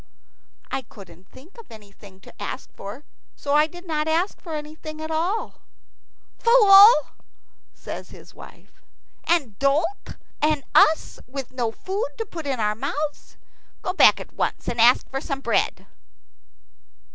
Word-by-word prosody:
"I - - -2
couldn't 190 -5 -16
think 335 - -16
of 460 - -13
anything 200 -3 -15
to - - -15
ask - - -6
for; 210 +9 -9 0.3
so 285 - -3
I 300 +1 +4
did 350 +3 -13
not 310 -2 -2
ask 335 +5 -1
for 325 -3 -6
anything 310 +1 -8
at 315 0 -6
all." 350 +8 -2 0.8
"Fool," 425 -3 +8 0.8
says - - -9
his - - -15
wife, - - -16 0.4
"and 290 - 0
dolt, 310 +8 0 0.3
and 300 -2 +1
us 315 +1 +3
with 265 0 -7
no 240 -3 -2
food 400 - -4
to 450 - -3
put 330 -6 -8
in 265 -3 -2
our 210 -1 +1
mouths. 290 +6 -5 0.5
Go 365 - -2
back - - +6
at - - -11
once, - - -3
and 235 - -1
ask 245 +2 +5
for 270 0 -5
some 275 -2 -4
bread." - - -1
300 Hz, 145 wpm, -23 LUFS, 250-345 Hz, 0.8 s, Fool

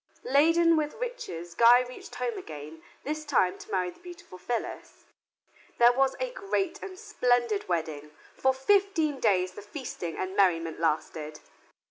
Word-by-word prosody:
Laden 330 +4 +4
with 300 -1 -1
riches, 315 - -6
Guy 235 +4 +7
reached 250 0 -9
home 470 - -2
again, 155 - -9 0.2
this 305 +1 -3
time 185 -11 +1
to - - -12
marry 180 -2 -1
the - - -21
beautiful 350 - -12
Phyllis. 235 +5 -5 0.7
There 240 +1 +6
was 270 +1 +2
a - - -2
great 390 -5 -2
and 375 -1 -8
splendid 245 - 0
wedding. 160 -4 -3 0.3
For 265 - +3
fifteen 320 0 +1
days 185 -5 +2
the - - -10
feasting 205 - -6
and 185 +1 -4
merriment 165 -5 +2
lasted. 155 -1 -2
245 Hz, 145 wpm, -28 LUFS, -, 0.7 s, Guy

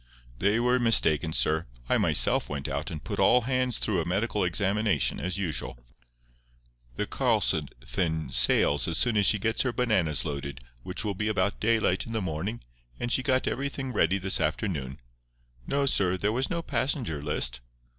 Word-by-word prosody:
"They 100 +5 +2
were 125 +1 +2
mistaken, 85 -9 +3
sir. 80 +1 +1 0.2
I - - +2
myself - - +3
went 70 0 -4
out 70 +4 -3
and 80 -4 -7
put - - -5
all 125 - +5
hands 125 -1 0
through 95 -6 0
a 80 - -5
medical 105 +3 -1
examination, 100 -1 +1
as 90 +1 -3
usual. 85 -10 -3 1.2
The - - -2
Karlsefin 80 -4 -1
sails - - +4
as 85 -2 0
soon 120 +2 +2
as 100 -2 +4
she 110 - +4
gets 110 +2 0
her 130 - 0
bananas 105 - 0
loaded, 70 -2 -5 0.2
which 90 - -4
will 105 - -1
be 105 +3 -3
about 100 -2 0
daylight 110 -4 +1
in 115 - -6
the 110 - 0
morning, 95 +6 -4 0.4
and 120 - -3
she 130 - +2
got 130 0 +1
everything 135 -1 -3
ready 95 -2 +2
this 95 0 0
afternoon. 75 -5 -2 0.7
No, 140 0 0
sir, 95 -8 +2
there 105 +3 -1
was 130 +3 -1
no 170 -1 -2
passenger 120 - -2
list. 60 -3 -1
100 Hz, 170 wpm, -27 LUFS, 80-115 Hz, 1.2 s, all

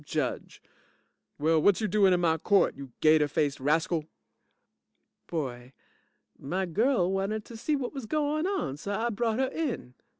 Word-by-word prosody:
JUDGE - - -4 0.7
Well, 160 +1 +2
whut 200 +3 +4
you 215 - 0
doin' 200 -2 +4
in 180 -1 +2
my 160 -2 +2
court, 200 +4 +3
you 135 -2 -9
gater 155 -1 +5
faced 145 -1 -1
rascal? 160 +3 +1 1.2
BOY 130 -6 -5 0.7
My 185 +7 -2
girl 190 - +1
wanted 195 +3 -2
to 235 - -11
see 265 +7 -2
whut 270 -1 -3
was 270 -6 -6
goin' 305 +3 0
on, 265 - -2
so 200 +6 -4
I 230 +4 -1
brought 225 +1 -1
her 265 0 +1
in. 265 - -4
190 Hz, 160 wpm, -28 LUFS, 155-235 Hz, 1.2 s, gater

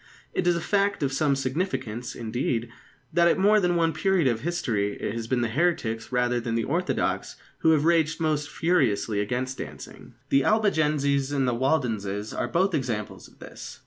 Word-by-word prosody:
It 180 - 0
is 175 - +4
a 170 - -2
fact 200 -1 +1
of 135 -1 0
some 140 0 +2
significance, 130 - -3
indeed, 120 0 -2 0.4
that 170 +1 +4
at - - +3
more 210 +3 +5
than 180 -3 +1
one 165 -1 +2
period 190 -5 +1
of 120 -3 +1
history 115 -12 -1
it - - -3
has 115 -1 -4
been 125 0 0
the 120 - +1
heretics 115 -6 -1
rather 125 -1 +1
than 115 -1 -3
the 115 - 0
orthodox 175 +8 -1 0.2
who 160 - +3
have 155 -1 +3
raged 165 -1 +2
most 150 -2 0
furiously 125 - +1
against 125 +5 -3
dancing. 75 - -9
The 135 0 +3
Albigenses 150 -10 +2
and 135 -2 +1
the 125 - +1
Waldenses 115 -6 -1
are - - -2
both 185 +2 +1
examples 115 -8 -3
of - - -22
this. - - -10
135 Hz, 180 wpm, -26 LUFS, 115-170 Hz, 0.4 s, more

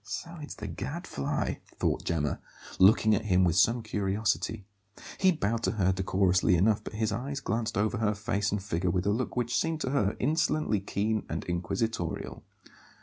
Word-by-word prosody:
"So 170 0 -6
it's 150 - -7
the 105 - -7
Gadfly," 120 - -3 0.2
thought - - 0
Gemma, 75 -4 -1 0.4
looking 110 +3 +6
at 105 - 0
him 95 -3 +3
with 85 -2 +2
some 115 +6 +3
curiosity. 105 +1 -1 0.5
He 190 -1 +5
bowed 115 - -1
to - - +1
her 95 -4 +2
decorously 95 -1 +2
enough, 105 +4 +2
but - - -7
his 110 0 0
eyes 140 +3 -3
glanced 115 -4 -2
over 110 +3 +1
her 105 -2 +1
face 105 0 -1
and 105 -2 -2
figure 90 -2 -1
with 90 +2 0
a 100 - +3
look 120 +4 -2
which 120 0 0
seemed 160 +4 0
to 130 - -1
her 105 -8 +1
insolently 155 -4 +1
keen 105 +2 -1
and - - -3
inquisitorial. 90 +1 -3
105 Hz, 175 wpm, -29 LUFS, 95-120 Hz, 0.5 s, looking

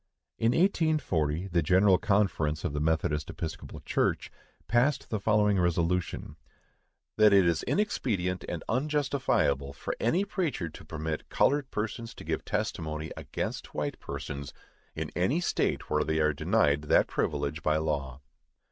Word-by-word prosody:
In 115 +2 +3
1840, 125 - +1
the 85 -1 +2
General 95 +4 +4
Conference 85 -8 +1
of - - -2
the 75 - -1
Methodist 75 -2 0
Episcopal 80 -1 -6
Church - - 0 0.4
passed 125 +4 +1
the 110 - 0
following 105 -1 +3
resolution: 85 0 0 0.8
"THAT 105 -1 +6
IT 100 -2 +6
IS 85 -2 +2
INEXPEDIENT 100 - 0
AND - - -4
UNJUSTIFIABLE 130 - 0
FOR - - -4
ANY 170 - +2
PREACHER 165 - -2
TO - - -12
PERMIT 80 0 -4
COLORED 140 -1 +2
PERSONS 110 +2 -4
TO - - -10
GIVE - - -2
TESTIMONY 80 -1 -3
AGAINST - - -5
WHITE - - -2
PERSONS 70 0 -6 0.4
IN - - -4
ANY 110 - +2
STATE 175 - -1
WHERE 75 0 +3
THEY 80 0 -1
ARE 75 -1 +3
DENIED 70 +1 +2
THAT - - +4
PRIVILEGE 75 +1 -2
BY 75 0 +2
LAW." 70 -4 -2
90 Hz, 140 wpm, -29 LUFS, 75-115 Hz, 0.8 s, THAT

